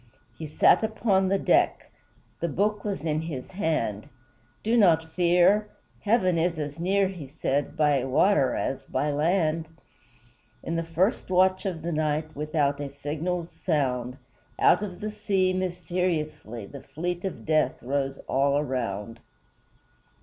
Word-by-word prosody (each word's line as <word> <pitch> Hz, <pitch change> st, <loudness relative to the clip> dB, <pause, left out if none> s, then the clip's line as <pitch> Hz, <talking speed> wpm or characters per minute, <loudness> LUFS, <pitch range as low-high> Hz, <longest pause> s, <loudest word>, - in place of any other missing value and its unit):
He 160 Hz, -, -7 dB
sat 150 Hz, -, +4 dB
upon 210 Hz, -3 st, +1 dB
the 195 Hz, +1 st, +2 dB
deck, -, -, +1 dB, 0.5 s
The 170 Hz, -, -1 dB
Book 205 Hz, +6 st, 0 dB
was 200 Hz, -7 st, -3 dB
in 155 Hz, -1 st, 0 dB
his 150 Hz, -6 st, -6 dB
hand; 155 Hz, -, -2 dB, 0.5 s
"Do 225 Hz, +2 st, +1 dB
not 165 Hz, -7 st, +4 dB
fear! 180 Hz, +4 st, +3 dB, 0.3 s
Heaven 190 Hz, -6 st, +2 dB
is 170 Hz, 0 st, 0 dB
as 150 Hz, 0 st, -5 dB
near," 195 Hz, +3 st, +2 dB
He 175 Hz, -7 st, -7 dB
said, 140 Hz, 0 st, -2 dB
"by 145 Hz, -4 st, +3 dB
water 135 Hz, +2 st, +3 dB
as 135 Hz, -, -2 dB
by 145 Hz, +3 st, -1 dB
land!" 160 Hz, +1 st, +1 dB, 1.0 s
In 165 Hz, -, -3 dB
the 165 Hz, -, 0 dB
first 165 Hz, +7 st, 0 dB
watch 185 Hz, +2 st, +3 dB
of 165 Hz, -4 st, -4 dB
the 170 Hz, -, -2 dB
night, 155 Hz, 0 st, -1 dB
Without 145 Hz, -1 st, 0 dB
a 145 Hz, -1 st, -4 dB
signal's 160 Hz, +5 st, -4 dB
sound, 130 Hz, -6 st, -1 dB, 0.4 s
Out -, -, +5 dB
of 190 Hz, -4 st, -6 dB
the 215 Hz, 0 st, -3 dB
sea, 195 Hz, -3 st, +1 dB
mysteriously, 170 Hz, -, -2 dB
The 140 Hz, +6 st, -10 dB
fleet 175 Hz, +2 st, -4 dB
of 190 Hz, -, -5 dB
Death 155 Hz, -1 st, +1 dB
rose 135 Hz, +1 st, -1 dB
all 140 Hz, +1 st, +2 dB
around. 115 Hz, -6 st, -3 dB
160 Hz, 140 wpm, -26 LUFS, 145-185 Hz, 1.0 s, Out